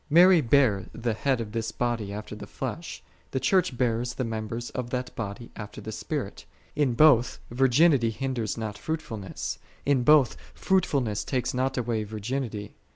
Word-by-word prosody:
Mary 175 +2 +7
bare 120 -6 +3
the 115 0 -1
Head 130 +3 0
of 110 -2 -5
This 115 0 -2
Body 115 -4 -2
after 105 +1 -6
the - - -9
flesh, - - -6 0.3
the 130 - -1
Church 140 -1 +2
bears 120 0 0
the 130 - -1
members 115 +1 -4
of 125 -2 -4
that 125 0 -3
Body 115 +1 -6
after 105 -1 -8
the 110 +1 -6
Spirit. - - -4 0.3
In 140 -5 +1
both 125 -4 +5
virginity 130 0 +4
hindeis 120 -3 -2
not 110 -2 -4
fruitfulness: 115 - -4 0.3
in 140 -3 +3
both 145 0 +5 0.2
fruitfulness 140 - +1
takes 130 -3 -1
not 130 +2 0
away 115 -3 0
virginity. 110 0 -4
120 Hz, 160 wpm, -27 LUFS, 110-135 Hz, 0.3 s, Mary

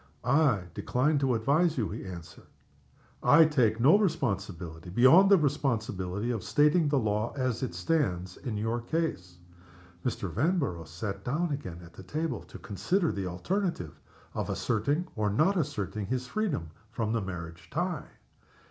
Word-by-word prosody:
"I 130 - +3
decline 145 - +1
to 130 -3 +2
advise 150 +8 +2
you," 110 -5 0
he 105 0 -6
answered. 85 -2 -10 0.7
"I 165 - +7
take 120 -8 +2
no 150 - +6
responsibility, 95 - -2
beyond 130 - +6
the 200 - +7
responsibility 115 - -1
of 110 -3 -3
stating 150 +8 +3
the 145 - +2
law 110 -1 0
as 130 -3 -1
it 125 -9 -3
stands, 90 - -1
in 120 -6 -4
your 115 +3 -1
case." 115 - -3 0.7
Mr. 115 -5 -2
Vanborough 115 - -1
sat 95 +5 -5
down 155 +6 -1
again 90 - -5
at 85 - -15
the - - -11
table, 155 - -3
to - - -12
consider 170 - 0
the 95 -2 -3
alternative 90 - -2 0.3
of - - -3
asserting 140 - 0
or 105 -1 0
not 155 - +2
asserting 110 - -2
his 125 0 -2
freedom 140 - -2 0.2
from 110 -1 -2
the 115 - 0
marriage 85 -3 -7
tie. 175 +2 -2
120 Hz, 150 wpm, -29 LUFS, 95-150 Hz, 0.7 s, I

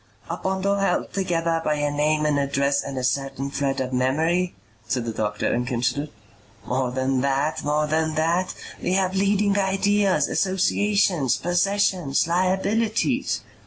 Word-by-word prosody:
"A - - -1
bundle 190 +1 0
held 195 -3 0
together 170 -3 0
by 150 - +1
a 145 0 -1
name 150 +1 +1
and 150 -1 +2
address 140 0 +1
and 140 -1 -6
a 130 - -2
certain 135 +1 -2
thread 140 -1 -1
of 130 0 -3
memory?" 160 +8 +1 0.3
said 125 -3 -1
the 115 - -3
doctor 105 -1 -1
and 120 0 -1
considered. 130 +4 -1 0.6
"More 130 0 -1
than 130 +1 0
that. 140 +3 0
More 150 +1 +1
than 160 +1 0
that. 170 +4 0 0.3
We 180 - 0
have 190 -1 +1
leading 200 +1 +2
ideas, 195 -4 +2
associations, 190 - +1
possessions, 175 -4 +1
liabilities." 200 +8 0
155 Hz, 145 wpm, -23 LUFS, 140-190 Hz, 0.6 s, and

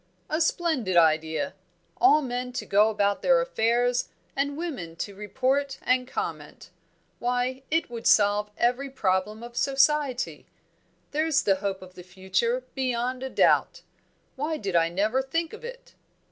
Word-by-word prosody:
"A 310 +2 +1
splendid 315 - +1
idea! 160 - +2 0.4
All 305 -5 +5
men 250 0 -4
to - - -4
go 210 +2 +4
about 205 -2 0
their - - +4
affairs 245 - +1 0.3
and 285 +1 -1
women 265 - -5
to 200 +4 -5
report 265 +7 -1
and 255 0 +1
comment. - - -6 0.5
Why, 250 +2 -1
it 325 +2 +1
would 230 -1 -3
solve 205 0 +4
every 250 +3 +1
problem 210 -2 -1
of 240 0 -10
society! 270 - +1 0.6
There's 310 0 +1
the 195 -2 +3
hope 190 -1 -3
of 185 0 -13
the 180 - -11
future, 190 +7 -1
beyond 255 -1 -1
a 265 - -4
doubt! - - +2 0.5
Why 305 +3 -2
did 195 -7 -4
I 165 0 +4
never 210 +9 +1
think 330 +6 -2
of 440 - -10
it!" - - -10
245 Hz, 145 wpm, -26 LUFS, 200-280 Hz, 0.6 s, All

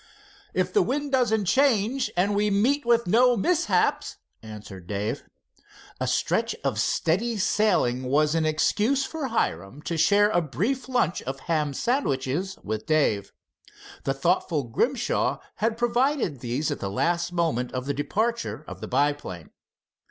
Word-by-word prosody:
"If - - 0
the 415 - +4
wind 285 0 -1
doesn't 220 -6 +2
change 255 +2 +2
and 195 +3 +2
we 210 +1 +2
meet 235 +7 +1
with 235 0 +3
no 245 +5 +4
mishaps," 345 - +1 0.2
answered 105 -5 -10
Dave. 105 +2 -3 0.8
A - - -1
stretch - - 0
of - - -1
steady 220 +8 0
sailing 200 - +2
was 150 +4 +2
an 165 -1 +1
excuse 215 - +1
for 315 -4 -4
Hiram 100 - -2
to 170 - -3
share 205 +5 +4
a 175 - +2
brief 220 - -2
lunch 245 -9 +1
of 135 +1 -6
ham 150 -4 -1
sandwiches 185 - -1
with 110 0 -4
Dave. 125 -11 +1 0.7
The 135 - 0
thoughtful 160 0 +1
Grimshaw 240 - 0 0.2
had 225 +1 0
provided 240 - +1
these 125 +5 -2
at - - -3
the 95 - -3
last 170 - 0
moment 160 -8 -1
of 130 0 -4
the 140 - -1
departure 215 - -2
of - - -9
the - - -5
biplane. 140 - -1
175 Hz, 145 wpm, -25 LUFS, -, 0.8 s, the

